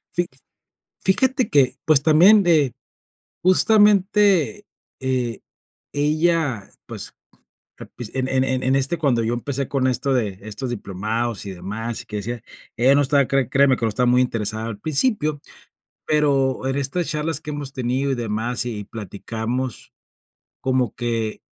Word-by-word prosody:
Fi 175 0 0 0.7
fíjate 255 +6 +2
que, 135 -3 +3
pues, 155 -3 +4
también 170 +8 +6
de 155 - +3 0.7
justamente, 205 -1 +4 0.3
eh, 125 -4 -1 0.5
ella, 150 - 0 0.2
pues, - - -7 0.6
al - - -10
princi 120 -3 -9
en 130 - 0
en 130 0 +2
en 130 -1 0
en 130 +1 +2
este 140 +6 0
cuando 135 -7 +1
yo 115 - 0
empecé 135 +3 -3
con 135 -2 0
esto 130 +2 0
de 105 -7 -1
estos 110 +4 -5
diplomados 110 +1 -3
y 100 - -5
demás 110 +5 -5
y - - -23
que 105 - -6
decía, 115 +3 -4 0.3
ella 130 +4 +4
no - - +4
estaba 140 -1 +3
cre 135 -3 +1
créeme 135 -1 +4
que - - -4
no - - +2
estaba 125 +4 0
muy 125 - +4
interesada 110 -2 -2
al 110 -3 -6
principio, 155 - 0 0.7
pero 140 -4 +1
en 135 0 -1
estas 140 +5 -1
charlas 155 0 -2
que 150 - -7
hemos 145 -2 -5
tenido 130 +1 -1
y - - +1
demás 120 +1 -2
y 105 -4 -4
platicamos, 115 +4 -5 0.7
como 130 -4 0
que 115 -3 -2
130 Hz, 155 wpm, -22 LUFS, 115-150 Hz, 0.7 s, también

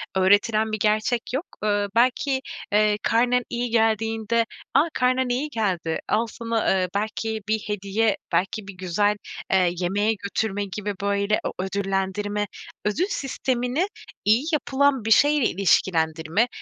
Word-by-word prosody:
öğretilen 205 +3 +3
bir 215 - -2
gerçek 215 +3 +1
yok. 280 +7 -1 0.2
Iıı, 205 -1 +1
belki, 255 +3 +2 0.3
eee, 210 0 +3
karnen 245 +2 +2
iyi 240 0 -2
geldiğinde, 225 0 +1 0.3
"A, 295 +5 +4
karnen 255 0 +1
iyi 265 +5 -1
geldi, 185 - -1
al 225 +2 +2
sana, 230 0 -1
eee, 185 -1 +1
belki 220 +1 -2
bir 220 - +2
hediye." 205 +1 0 0.2
belki 195 +2 0
bir 195 - -7
güzel, 195 +3 +1 0.4
eee, 185 -2 +4
yemeğe 205 +4 +1
götürme 205 0 -2
gibi, 205 +1 -3
böyle, 200 +1 +1
o - - -2
ödüllendirme, 195 +2 -1 0.4
ödül 255 - +1
sistemini 265 +1 -1 0.4
iyi 220 +6 +4
yapılan 280 -4 +2
bir 225 - -1
şeyle 290 +2 +5
ilişkilendirme. 165 0 +2
215 Hz, 135 wpm, -24 LUFS, 200-240 Hz, 0.4 s, şeyle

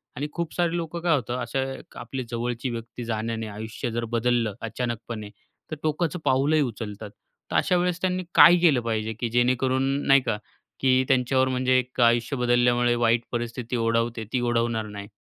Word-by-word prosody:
आणि 145 +3 -3
खूप 170 -2 -4
सारे 175 -1 0
लोकं 170 0 -4
काय 170 -2 +3
होतं, 125 -2 -2
अशा 120 +3 -2 0.4
आपली 135 -1 -5
जवळची 120 +1 -2
व्यक्ती 120 +1 -6
जाण्याने 115 0 -3
आयुष्य 110 +4 -5
जर 115 +1 -2
बदललं 115 -2 +1
अचानकपणे, 115 -2 -4 0.4
तर - - -2
टोकाचं 160 +3 -1
पाऊलही 140 +4 +3
उचलतात. 110 -4 -4 0.4
तर - - -2
अशा 180 - +3
वेळेस 180 0 0
त्यांनी 185 0 0
काय 175 - +9
केलं 155 -8 +4
पाहिजे? 110 -1 -2
की 120 - -1
जेणेकरून 130 +2 +1 0.2
नाही 135 0 +6
का, 115 -4 -1 0.4
की 130 -1 +3
त्यांच्यावर 130 0 +2
म्हणजे 130 0 +2
एक 125 0 -4
आयुष्य 120 +3 +3
बदलल्यामुळे 120 0 +3
वाईट 115 0 +2
परिस्थिती 120 0 -3
ओढवते, 115 0 0
ती 130 - +2
ओढवणार 115 -2 0
नाही. 100 -1 -8
120 Hz, 165 wpm, -25 LUFS, 115-135 Hz, 0.4 s, काय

